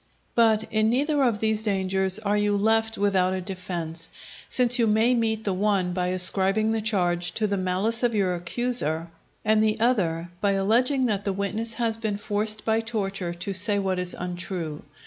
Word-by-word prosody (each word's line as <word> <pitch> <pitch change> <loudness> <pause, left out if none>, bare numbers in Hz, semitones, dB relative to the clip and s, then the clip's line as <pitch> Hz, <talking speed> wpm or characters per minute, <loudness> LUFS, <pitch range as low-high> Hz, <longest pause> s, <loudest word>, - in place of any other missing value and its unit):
But 220 -2 +3
in 215 0 +2
neither 285 +4 +1
of 240 -5 +2
these 220 -1 +1
dangers 190 -2 0
are 210 -1 -1
you 205 0 +1
left 225 +2 +1
without 190 -2 +1
a - - -2
defence; 175 -3 -5 0.4
since 245 0 +2
you 230 - +3
may 220 +3 +3
meet 220 -2 0
the 200 - -1
one 190 -2 0
by 180 0 -1
ascribing 190 +4 +2
the 225 0 -1
charge 175 -5 +1
to 220 - -1
the 200 -1 0
malice 190 +5 0
of 240 -2 +1
your 190 -3 +1
accuser, 170 -3 -2 0.3
and 215 0 +3
the 215 0 +1
other 175 -8 0
by 200 -1 +2
alleging 245 +7 +2
that 205 -4 0
the 200 - -1
witness 215 +4 0
his 230 -2 0
been 215 -3 -2
forced 210 +1 -1
by 220 0 +2
torture 195 -6 -3
to 195 +3 -5
say 205 +2 +2
what 190 -2 -1
is 180 0 +1
untrue. 175 -3 -5
205 Hz, 185 wpm, -25 LUFS, 185-225 Hz, 0.4 s, But